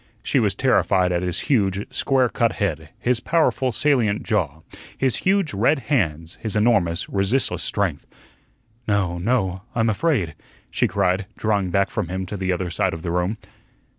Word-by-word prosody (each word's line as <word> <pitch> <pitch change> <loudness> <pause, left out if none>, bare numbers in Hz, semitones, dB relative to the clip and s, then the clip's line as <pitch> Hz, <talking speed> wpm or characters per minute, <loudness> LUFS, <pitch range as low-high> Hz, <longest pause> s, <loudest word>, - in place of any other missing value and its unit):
She - - +1
was - - +1
terrified 90 -2 +2
at 85 -1 0
his 90 -2 -2
huge, 100 -6 +1
square 130 -2 +2
cut - - 0
head; - - -2
his 125 -1 0
powerful, 135 -4 +1
salient 120 -4 +1
jaw; 80 - -1 0.4
his 130 -3 +1
huge, 190 - +1
red 115 +10 +3 0.2
hands; 80 - -1
his 110 -3 -3
enormous, 100 -6 +2
resistless 100 +7 0
strength. 95 -8 -2 0.8
"No, 95 -4 0
no 95 -3 0
I'm 115 -1 +2
afraid," 105 - 0 0.4
she - - +1
cried, 95 0 0
drawing 100 -4 0
back 100 +2 +1
from - - -2
him 95 +1 -3
to 100 - -6
the 95 -1 -1
other 90 -1 -2
side - - 0
of 80 - -9
the 85 - -2
room. 90 +5 0
100 Hz, 165 wpm, -22 LUFS, 90-120 Hz, 0.8 s, red